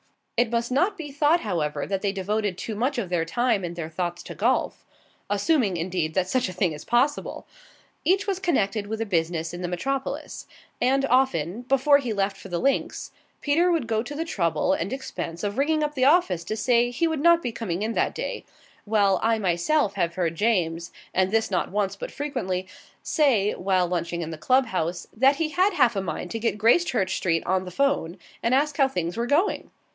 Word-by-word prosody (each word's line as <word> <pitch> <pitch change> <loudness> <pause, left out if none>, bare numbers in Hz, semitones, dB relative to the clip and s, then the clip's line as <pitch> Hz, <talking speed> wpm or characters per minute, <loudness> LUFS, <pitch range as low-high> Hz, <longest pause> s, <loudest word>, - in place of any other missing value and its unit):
It 240 -1 +2
must 235 +1 -1
not 360 +10 +2
be 305 -4 -7
thought, 295 +4 +3
however, 150 -8 -2
that 195 -1 -2
they 200 - 0
devoted 205 0 -2
too 220 - -5
much 250 +7 -1
of 205 -7 -2
their 175 -2 +1
time 225 +3 +1
and 175 -1 -4
their 165 -2 -5
thoughts 175 +1 -3
to - - -8
golf - - 0 0.5
assuming, 205 - +1
indeed, 170 -2 -2
that 185 -1 +1
such 250 0 0
a - - -6
thing 180 -2 0
is 150 - -9
possible. 265 +5 0 0.6
Each 385 +2 +2
was 390 -2 -1
connected 215 - 0
with 220 +1 -4
a 225 - -1
business 165 -3 -1
in 175 - -6
the 180 - -2
metropolis; 265 +10 -4 0.3
and 270 +2 +3
often, 240 - +1
before 275 +3 +4
he 245 -5 -3
left 195 -1 0
for 195 - -11
the 175 - -2
links, 275 +8 -1 0.3
Peter 335 +5 +3
would 330 -7 +1
go 220 -1 0
to 280 +5 -7
the 325 +2 -2
trouble 170 - 0
and 175 +6 -2
expense 170 -10 -5
of 205 +4 -2
ringing 305 +2 +2
up 300 0 -1
the 260 -3 +1
office 270 - +3
to 215 - -3
say 240 +1 +3
he 245 +8 0
would 320 -3 -2
not 340 +1 +5
be 245 - -2
coming 205 -4 -3
in 225 +1 -1
that - - 0
day; - - -4 0.4
while 205 -3 +3
I 225 0 +2
myself 200 - +1
have 170 -3 -1
heard 170 -3 0
James 170 -4 0 0.2
and 185 0 +2
this 220 0 +1
not 180 - 0
once, 200 0 -1
but - - -6
frequently 245 -11 -3 0.4
say, 240 - +2
while 185 -1 +1
lunching 170 -1 -2
in 160 - -5
the 160 - -6
club 260 +8 +3
house, 180 -5 -2
that 265 +5 +4
he 310 +2 -1
had 370 +5 +2
half 240 -10 +3
a 195 - 0
mind 175 0 -5
to 225 - -3
get 230 -1 -1
Gracechurch 225 - +2
Street 165 -3 0
on 185 +1 0
the - - -6
'phone 205 -6 0 0.2
and 235 +3 +2
ask 295 +2 +1
how 275 -3 +5
things 175 -8 -3
were 235 +1 -2
going. 320 +10 +1
215 Hz, 210 wpm, -25 LUFS, 180-275 Hz, 0.6 s, not